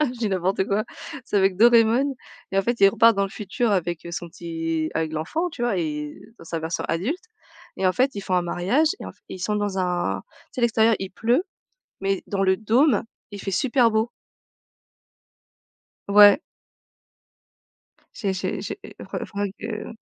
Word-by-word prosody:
je - - -12
dis 225 -3 0
n'importe 190 0 0
quoi. 205 +2 0 0.4
C'est - - -2
avec 190 -2 +3
Doreamon 235 +4 +5 0.4
et, 195 - +2
en - - +3
fait, 240 +2 -1
il 195 - +8
repart 230 0 +5
dans 200 - +2
le - - -3
futur 215 +2 -1
avec, 175 -3 -1
heu, 170 - -7
son 175 0 -5
petit 165 -2 -3
avec 160 -1 -1
l'enfant, 305 - -2
tu 290 -7 -7
vois? 240 -5 +1
Et 150 -2 -3
heu, 225 +3 -18
dans - - -12
sa 165 0 -4
version 160 +2 -3
adulte 235 - -2 0.5
et 190 - 0
en 185 - +4
fait, 260 +4 +2
ils 200 - -4
font 185 - -1
un 180 - +3
mariage 195 - +1
et - - -6
en - - -6
f - - -33
et - - -7
ils - - -12
sont 210 +3 0
dans 205 -2 -1
un 180 -1 0 0.3
tu - - -26
sais, - - -2
l'extérieur 225 -1 +4
il 190 -1 -4
pleut, 240 - +1 0.6
mais 195 0 0
dans 195 -1 0
le 190 0 +4
dôme 230 +4 +3 0.3
il 200 - -7
fait 195 - -3
super 245 +3 +3
beau. 220 +2 +1 2.0
Ouais. 205 +3 +8 1.8
J'ai 200 -4 -1
j'ai 185 - -3
j'ai - - -5 0.2
re - - -5
faudra 205 0 -3
que 220 0 -6
200 Hz, 190 wpm, -24 LUFS, 180-230 Hz, 2.0 s, il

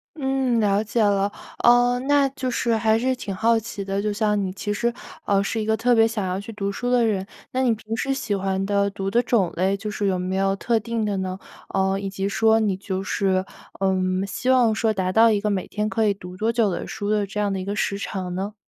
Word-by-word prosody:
嗯， 265 -4 0
了 205 0 +2
解 225 +1 -1
了。 200 -1 +2 0.3
呃， 245 +1 +5
那 285 0 +3
就 260 -2 -4
是 235 -1 +1
还 220 0 +2
是 260 +1 +1
挺 200 -5 -5
好 225 +4 +3
奇 215 -3 -5
的， 195 +1 -2
就 210 0 -1
像 210 0 +1
你 190 -1 -2
其 205 +2 -3
实， 235 +2 0 0.3
呃， 200 -1 +3
是 220 +3 -2
一 - - -3
个 220 0 +2
特 245 +1 +3
别 225 0 +6
想 215 -4 -2
要 185 +1 -2
去 225 +3 -8
读 200 -2 -3
书 245 +5 -3
的 240 -2 +4
人， 195 -3 0 0.3
那 260 +1 0
你 240 -3 +3
平 220 +1 -5
时 270 +4 -1
喜 220 -6 -2
欢 190 0 -1
的 200 0 +1
读 195 0 -4
的 240 +4 +2
种 195 -8 +1
类 190 +3 +1
就 210 +2 -5
是 205 -1 -2
有 185 -2 0
没 185 +1 -2
有 195 0 +2
特 230 +2 +1
定 230 -1 -2
的 205 -1 -1
呢？ 185 0 -3 0.3
呃， 190 0 +1
以 195 0 -4
及 195 0 -3
说 220 +2 +3
你 205 -4 +1
就 190 -1 -4
是， 190 -1 0 0.3
呃， 190 -1 +2 0.3
希 255 +6 -3
望 240 -4 +4
说 220 0 +1
达 185 -2 -1
到 225 0 +6
一 205 - +2
个 210 0 -1
每 195 -2 -1
天 210 0 -2
可 225 0 +1
以 205 - +3
读 180 -2 -10
多 220 +4 0
久 230 -3 +2
的 175 - -3
书 205 -1 -4
的 210 -1 +1
这 195 +2 -5
样 205 -1 +1
的 - - -2
一 - - -4
个 200 - -2
时 200 -1 -1
长 185 -3 -4
呢？ 200 +3 -3
210 Hz, 275 characters per minute, -23 LUFS, 195-230 Hz, 0.3 s, 别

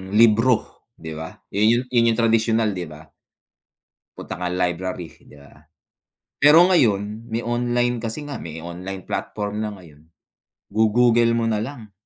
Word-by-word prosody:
libro, 115 +2 +3
'di 80 -1 -9
ba? 80 0 -7 0.2
Iyu 110 +4 +3
'yun 120 -2 +3
yung 110 - -3
tradisyunal, 115 -1 +2
'di 90 -3 -4
ba? 75 +1 -13 1.1
Punta - - -7
kang 90 0 -2
library, 90 -1 -3 0.2
'di - - -16
ba? 70 0 -18 0.8
Pero 155 +5 +6
ngayon, 110 - +1
may 115 - -1
online 120 +1 0
kasi 115 +6 -4
nga, 145 - -5
may 80 -1 -7
online 90 +3 -8
platform 105 0 -4
na 105 - -3
ngayon, 85 -7 -15 0.7
go-Google 115 +1 +3
mo 115 - 0
na 110 -1 0
lang. 115 -5 -8
110 Hz, 145 wpm, -22 LUFS, 90-120 Hz, 1.1 s, Pero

